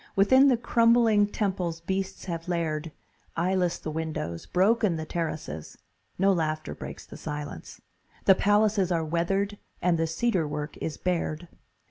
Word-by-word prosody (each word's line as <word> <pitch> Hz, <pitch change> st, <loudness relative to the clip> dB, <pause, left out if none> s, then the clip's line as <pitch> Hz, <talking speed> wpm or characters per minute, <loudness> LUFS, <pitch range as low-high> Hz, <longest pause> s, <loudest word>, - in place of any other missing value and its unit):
Within 260 Hz, +8 st, +6 dB
the 255 Hz, -3 st, +4 dB
crumbling 230 Hz, -3 st, +4 dB
temples 185 Hz, -5 st, -2 dB
beasts 190 Hz, +2 st, -3 dB
have 170 Hz, -2 st, -5 dB
laired; 165 Hz, -2 st, -2 dB, 0.5 s
Eyeless 180 Hz, 0 st, +1 dB
the 155 Hz, -, -6 dB
windows, 155 Hz, -, -4 dB
broken 205 Hz, 0 st, +3 dB
the 160 Hz, 0 st, -4 dB
terraces; 155 Hz, -, -4 dB, 0.4 s
No 195 Hz, +1 st, +4 dB
laughter 155 Hz, -2 st, -2 dB
breaks -, -, -8 dB
the -, -, -11 dB
silence. 145 Hz, -, -7 dB, 0.5 s
The 195 Hz, -, +8 dB
palaces 205 Hz, -1 st, +2 dB
Are 165 Hz, -2 st, +1 dB
weathered 195 Hz, +5 st, -1 dB, 0.2 s
and 170 Hz, -2 st, +2 dB
the 165 Hz, -, +1 dB
cedar 175 Hz, -1 st, 0 dB
work 150 Hz, +1 st, -4 dB
is 160 Hz, -, -4 dB
bared. 175 Hz, -2 st, -2 dB
175 Hz, 140 wpm, -27 LUFS, 160-200 Hz, 0.5 s, The